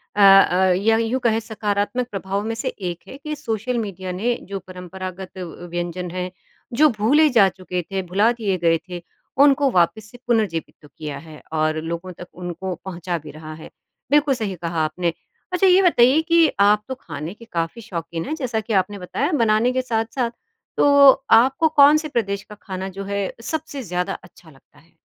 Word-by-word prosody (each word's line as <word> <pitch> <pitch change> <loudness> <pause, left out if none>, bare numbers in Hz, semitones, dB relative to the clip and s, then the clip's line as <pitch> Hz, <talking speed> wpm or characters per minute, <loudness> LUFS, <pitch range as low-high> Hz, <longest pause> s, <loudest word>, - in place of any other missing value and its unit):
अ, - - -3
अ, 190 -2 +6
या 225 0 +4
यूँ 230 +3 0
कहे 225 -1 +2
सकारात्मक 220 +2 -2
प्रभाव 195 +1 -3
में 225 0 -2
से 225 - -4
एक 175 -3 -5
है 270 - -9
कि 300 +1 -5
सोशल 240 -2 -3
मीडिया 190 -4 -4
ने 225 +7 0 0.2
जो 195 -1 -4
परंपरागत 185 +1 -8
अ, 185 - -4 0.3
व्यंजन 175 0 -4
हैं, 180 0 -4 0.4
जो 305 +5 +5
भूले 290 +9 +4
जा 225 -7 +5
चुके 185 -1 -5
थे, 195 -1 -1
भुला 195 +5 +2
दिए 215 -6 -1
गए 165 -1 +2
थे, 175 -1 -6 0.4
उनको 280 0 +5
वापस 185 +5 +1
से 245 - -13
पुनर्जीवित 215 -9 0
तो 150 - -15
किया 150 -2 -5
है 155 0 -12
और 155 0 +1
लोगों 170 +3 -5
तक 180 - -9
उनको 180 +1 -5
पहुँचा 175 -1 -4
भी 155 -2 -10
रहा 155 +1 -9
है। 155 0 -11 0.4
बिल्कुल 295 -1 +4
सही 210 -5 -3
कहा 165 -2 -1
आपने। 170 +2 -2 0.4
अच्छा 365 +1 +3
ये 370 +1 +6
बताइए 305 -5 +5
कि 335 0 +4
आप 210 +1 +4
तो 260 - -4
खाने 160 - -7
के 230 - -15
काफ़ी 170 +7 -3
शौकीन 170 -5 -5
हैं, 310 - -3
जैसा 250 -7 -2
कि 220 0 -4
आपने 195 +1 +1
बताया 275 - -2
बनाने 230 -3 +2
के 255 - +1
साथ-साथ, 230 0 -2 0.5
तो 280 -1 +7 0.2
आपको 265 +7 +5
कौन 295 0 +6
से 310 - -4
प्रदेश 200 -6 -2
का 210 - -12
खाना 190 0 -5
जो - - -3
है 200 0 -2
अ, - - -13
सबसे 295 +1 -4
ज़्यादा 180 0 -2
अच्छा 175 -1 -18
लगता 145 +1 -22
है? 165 +3 -27
200 Hz, 195 wpm, -21 LUFS, 180-245 Hz, 0.5 s, तो